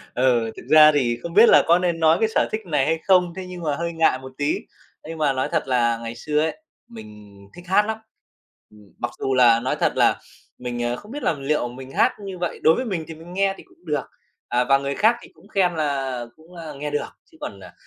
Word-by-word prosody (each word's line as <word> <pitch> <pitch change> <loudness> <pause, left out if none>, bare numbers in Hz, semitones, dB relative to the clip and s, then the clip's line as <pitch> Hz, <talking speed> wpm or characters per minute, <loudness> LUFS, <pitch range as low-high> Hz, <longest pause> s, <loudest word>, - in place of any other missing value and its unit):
Ừ, 120 -3 +2
thực - - -10
ra 155 -1 +8
thì 125 -5 0
không 170 - -6
biết 220 +5 +7
là - - +7
có 170 +2 +5
nên 175 -2 -1
nói 160 0 +4
cái 220 - +2
sở - - +3
thích 215 - -2
này 150 -6 +1
hay 160 +2 0
không? 180 -3 +4
Thế 190 - -6
nhưng 180 -1 -8
mà 150 -3 0
hơi 170 +2 -3
ngại 160 -5 +2
một 130 0 -10
tí. 145 +1 0 0.5
Nhưng 165 0 -7
mà 150 -3 +1
nói 130 0 -2
thật 165 -4 -1
là 120 -3 +2
ngày 115 0 -7
xưa 150 +5 -1
ấy, 160 - -2 0.3
mình 105 -3 -13 0.2
thích 175 - -12
hát 200 +3 +3
lắm. 220 0 -3 0.7
Ừm, 105 -2 -19
mặc 120 - -3
dù 135 - -1
là 120 -2 +5
nói 130 +2 -2
thật - - +2
là - - +3 0.4
mình, 120 -1 -4
ờ, 120 0 -1
không 210 - -12
biết 290 +1 -6
là - - +2
liệu 140 -3 -1
mình 130 +2 -10
hát - - +2
như 190 -2 -7
vậy 175 0 -4
đối 160 - +6
với 255 - -2
mình 185 -9 -3
thì 165 - -7
mình 165 +3 -13
nghe 195 +1 +1
thì - - -13
cũng - - -25
được. 150 -2 -1 0.4
À, 125 +1 +1
và 135 +2 +4
người 140 0 -3
khác 225 +8 +3
thì - - -13
cũng - - -21
khen 185 -4 +1
là 135 -5 -2
cũng, 165 +3 -18
a, 160 -3 -7
nghe 150 +1 -5
được, 145 - -2 0.2
chứ - - -20
còn, 100 - -7
à, 90 -2 -12
150 Hz, 255 wpm, -22 LUFS, 125-175 Hz, 0.7 s, ra